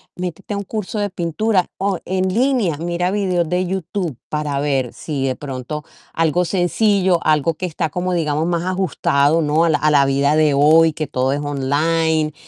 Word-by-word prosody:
métete 180 Hz, +3 st, -5 dB
a -, -, -2 dB
un 200 Hz, -, -3 dB
curso 215 Hz, +1 st, -4 dB
de 205 Hz, 0 st, -1 dB
pintura 180 Hz, +2 st, 0 dB
o 195 Hz, -1 st, -1 dB
en 185 Hz, 0 st, 0 dB
línea, 235 Hz, -, +1 dB
mira 175 Hz, +3 st, -1 dB
videos 185 Hz, -4 st, 0 dB
de 180 Hz, +2 st, 0 dB
YouTube, 180 Hz, -, -3 dB
para 150 Hz, -2 st, -2 dB
ver 135 Hz, -4 st, -1 dB
si 140 Hz, -4 st, -4 dB
de 130 Hz, -1 st, -1 dB
pronto 140 Hz, +2 st, -6 dB, 0.3 s
algo 165 Hz, +2 st, +1 dB
sencillo, 190 Hz, +1 st, +2 dB
algo 155 Hz, +1 st, +2 dB
que 185 Hz, -, -4 dB
está 160 Hz, -1 st, -2 dB
como 180 Hz, +3 st, -2 dB
digamos, 155 Hz, -2 st, 0 dB
más 170 Hz, -1 st, -1 dB
ajustado, 165 Hz, -5 st, +1 dB
¿no? 155 Hz, +2 st, +2 dB
a -, -, +2 dB
la 155 Hz, -, +3 dB
a 155 Hz, -, +2 dB
la 140 Hz, -2 st, +5 dB
vida 140 Hz, +2 st, +2 dB
de 155 Hz, -2 st, +3 dB
hoy, 160 Hz, +3 st, +5 dB
que 155 Hz, -1 st, -4 dB
todo 130 Hz, +1 st, 0 dB
es 145 Hz, -, -2 dB
online, 155 Hz, +3 st, 0 dB
165 Hz, 190 wpm, -19 LUFS, 150-185 Hz, 0.3 s, la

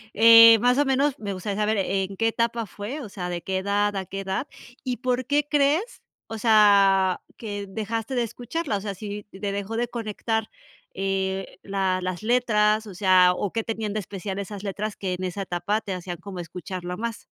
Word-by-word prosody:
Eh, 230 Hz, +1 st, +9 dB
más 250 Hz, +3 st, +3 dB
o 290 Hz, -, +3 dB
menos 270 Hz, +2 st, +2 dB
me 205 Hz, -2 st, -4 dB
gustaría 195 Hz, +2 st, -4 dB
saber, 215 Hz, +1 st, +1 dB
¿en 195 Hz, 0 st, -1 dB
qué 225 Hz, +2 st, +2 dB
etapa 230 Hz, 0 st, -1 dB
fue? 205 Hz, -, -6 dB
O 225 Hz, -, -8 dB
sea, 180 Hz, -3 st, -5 dB
¿de 175 Hz, -1 st, -3 dB
qué 190 Hz, 0 st, -1 dB
edad 205 Hz, +1 st, 0 dB
a 190 Hz, -1 st, -3 dB
qué 195 Hz, +2 st, -5 dB
edad? 190 Hz, +8 st, -3 dB, 0.4 s
¿Y 250 Hz, -2 st, -2 dB
por 250 Hz, 0 st, -1 dB
qué 290 Hz, 0 st, +1 dB
crees, 295 Hz, -, +1 dB, 0.2 s
o 225 Hz, -, -7 dB
sea, 200 Hz, -4 st, +5 dB, 0.2 s
que 205 Hz, -3 st, -5 dB
dejaste 225 Hz, +4 st, -3 dB
de 245 Hz, -, +2 dB
escucharla? 245 Hz, +3 st, -3 dB
O 195 Hz, -, -6 dB
sea, 200 Hz, -1 st, -4 dB
si 205 Hz, +1 st, -6 dB
te 200 Hz, 0 st, -5 dB
dejó 200 Hz, +3 st, -4 dB
de 240 Hz, +1 st, 0 dB
conectar 225 Hz, -1 st, -3 dB, 0.5 s
eh, 195 Hz, 0 st, -2 dB
la 195 Hz, -2 st, -1 dB
las 185 Hz, +1 st, -4 dB
letras, 215 Hz, -2 st, +2 dB
o 195 Hz, -, -9 dB
sea, 185 Hz, -1 st, +5 dB
¿o 200 Hz, -, -2 dB
qué 225 Hz, -, -1 dB
tenían 220 Hz, -2 st, -3 dB
de 215 Hz, -, -1 dB
especial 195 Hz, 0 st, -5 dB
esas 200 Hz, 0 st, -6 dB
letras 205 Hz, +1 st, -3 dB
que 190 Hz, -2 st, -3 dB
en 180 Hz, +1 st, -5 dB
esa 190 Hz, +2 st, -3 dB
etapa 180 Hz, +4 st, -1 dB
te 195 Hz, -, -5 dB
hacían 175 Hz, -1 st, -5 dB
como 190 Hz, +1 st, -8 dB
escucharla 180 Hz, +1 st, -6 dB
más? 230 Hz, -1 st, -5 dB
205 Hz, 200 wpm, -25 LUFS, 190-230 Hz, 0.5 s, Eh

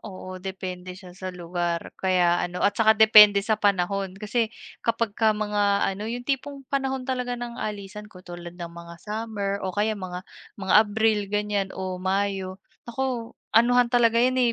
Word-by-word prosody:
Oo, 185 Hz, -1 st, -9 dB
depende 185 Hz, -1 st, -6 dB
siya 185 Hz, -2 st, -12 dB
sa 185 Hz, +1 st, -7 dB
lugar. 175 Hz, -1 st, -3 dB
Kaya 180 Hz, -2 st, +2 dB
ano 180 Hz, +1 st, -2 dB
at 200 Hz, -, +4 dB
saka 220 Hz, 0 st, +4 dB
depende 210 Hz, -2 st, +8 dB
sa 220 Hz, -1 st, +2 dB
panahon, 195 Hz, -1 st, 0 dB
kasi 220 Hz, +2 st, -1 dB, 0.3 s
kapagka 230 Hz, -1 st, +1 dB
mga 205 Hz, -1 st, +1 dB
ano, 210 Hz, +3 st, -6 dB
'yung 245 Hz, +1 st, -5 dB
tipong 275 Hz, 0 st, -3 dB
panahon 265 Hz, -1 st, -1 dB
talaga 250 Hz, -2 st, -2 dB
ng 240 Hz, 0 st, -6 dB
alisan, 210 Hz, 0 st, -6 dB
katulad 175 Hz, -2 st, -10 dB
ng 170 Hz, -1 st, -7 dB
mga 170 Hz, 0 st, -10 dB
summer 210 Hz, -2 st, -3 dB
o 190 Hz, -, -2 dB
kaya 210 Hz, +3 st, 0 dB
mga, 185 Hz, -2 st, -7 dB, 0.3 s
mga 190 Hz, -1 st, 0 dB
Abril, 220 Hz, 0 st, +2 dB
ganyan, 205 Hz, -2 st, -1 dB
o 185 Hz, -1 st, -4 dB
Mayo, 190 Hz, -1 st, -1 dB, 0.3 s
naku, 240 Hz, -2 st, -3 dB, 0.2 s
anuhan 245 Hz, +1 st, +4 dB
talaga 230 Hz, -1 st, +4 dB
'yan, 255 Hz, +2 st, +3 dB
eh, 240 Hz, -1 st, +3 dB
205 Hz, 160 wpm, -25 LUFS, 185-230 Hz, 0.3 s, depende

